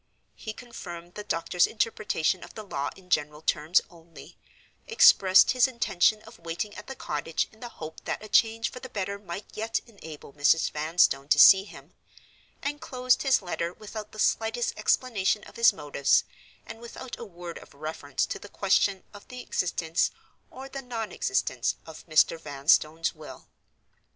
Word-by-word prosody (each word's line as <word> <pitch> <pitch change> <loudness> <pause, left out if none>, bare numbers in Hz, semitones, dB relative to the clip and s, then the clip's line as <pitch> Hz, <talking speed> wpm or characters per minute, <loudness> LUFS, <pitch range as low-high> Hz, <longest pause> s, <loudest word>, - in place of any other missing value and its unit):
He 220 - -7
confirmed 175 -8 -10
the 210 - -7
doctors' 175 -2 +1
interpretation 210 -6 -1
of - - -13
the 215 - -7
law 145 -8 -3
in 180 -1 -19
general 150 -1 0
terms 160 +4 +2
only; 165 -1 -15 0.5
expressed 195 - +6
his 255 0 +4
intention 215 -4 +1
of 225 -4 -15
waiting 170 +5 -4
at 210 - -10
the 265 - -7
cottage 155 - -2
in 220 - -21
the 240 - -7
hope 160 -7 -10
that - - -3
a - - -8
change 225 +1 +2
for 250 - -9
the 260 - -9
better 200 -2 -4
might 190 0 -7
yet 225 +1 -1
enable 160 - -12
Mrs. 150 +2 +3
Vanstone 150 -3 +2
to 145 - +4
see 190 +6 +8
him; - - -14 0.7
and 290 +1 -3
closed 255 -1 +1
his 265 -7 +2
letter 170 -1 -3
without 215 +1 -9
the - - -13
slightest 225 +2 0
explanation 215 -4 +1
of - - -14
his 230 - +6
motives, 145 -6 +1 0.4
and 225 0 -9
without 235 +2 -9
a - - -6
word 175 -5 -9
of - - -17
reference 145 -2 -3
to - - -5
the 205 - -12
question 195 -1 +1
of 205 - -13
the 250 0 -8
existence, 165 -1 0 0.4
or 265 +1 -9
the 270 0 -7
non 230 -5 -5
existence, 125 -2 -1
of 160 +1 -12
Mr. 155 +1 +3
Vanstone's 155 +2 +1
will. 155 -2 -12
190 Hz, 170 wpm, -27 LUFS, 160-225 Hz, 0.7 s, see